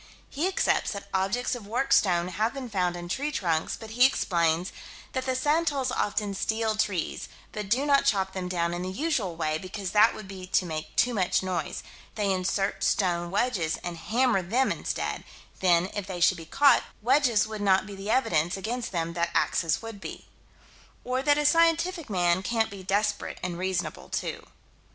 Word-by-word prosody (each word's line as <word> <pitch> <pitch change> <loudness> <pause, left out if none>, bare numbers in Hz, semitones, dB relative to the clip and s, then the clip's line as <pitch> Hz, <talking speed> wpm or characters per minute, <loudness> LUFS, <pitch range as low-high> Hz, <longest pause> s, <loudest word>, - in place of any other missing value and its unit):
He 310 +6 0
accepts 380 - +1
that 200 0 -7
objects 195 +7 0
of 235 -5 -6
worked 245 +5 +1
stone 175 -3 +3
have 215 +8 -1
been 255 -4 -6
found 180 -3 0
in 175 0 -6
tree 280 +11 -2
trunks, 165 - -1
but 220 -1 -9
he 245 +3 +3
explains: 170 -8 +2 0.4
That 260 0 -3
the 260 - +1
Santals 290 -1 +1
often 205 -3 -1
steal 220 +2 0
trees, 205 -6 -2 0.2
but 210 -2 -5
do 255 +6 +2
not 280 -1 +4
chop 195 -6 +1
them 185 -1 -4
down 170 -1 0
in 175 - -3
the 185 - -3
usual 215 - -1
way, 155 -1 -1
because 185 +1 -5
that 215 +2 +5
would 215 - -9
be 190 -1 -8
to 185 - +2
make 155 -2 -5
too 245 - +3
much 190 -3 +1
noise: 185 -1 -3 0.3
they 205 -2 0
insert 190 +2 -1
stone 175 -3 +1
wedges, 185 -6 0
and 175 -1 -4
hammer 225 +4 +1
them 235 +9 +1
instead: - - -3 0.4
then, 180 0 +3
if 205 -2 -4
they 185 -2 -5
should 185 +2 +4
be 165 -1 -10
caught, 285 - +5 0.2
wedges 250 -3 +3
would 215 -1 -6
not 190 -2 +3
be 205 - -9
the 195 +2 -7
evidence 175 -8 +1
against 235 +5 -3
them 170 -2 -2
that 170 0 0
axes 165 +5 +1
would 225 -3 -8
be. - - -8 0.8
Or 255 +1 -1
that 290 +1 +3
a 295 - +1
scientific 330 +1 +3
man 175 -2 +2
can't 225 +2 0
be 200 -1 -8
desperate 205 +2 -1
and 180 -1 -2
reasonable 180 -3 -3
too. - - -4
200 Hz, 190 wpm, -27 LUFS, 180-245 Hz, 0.8 s, that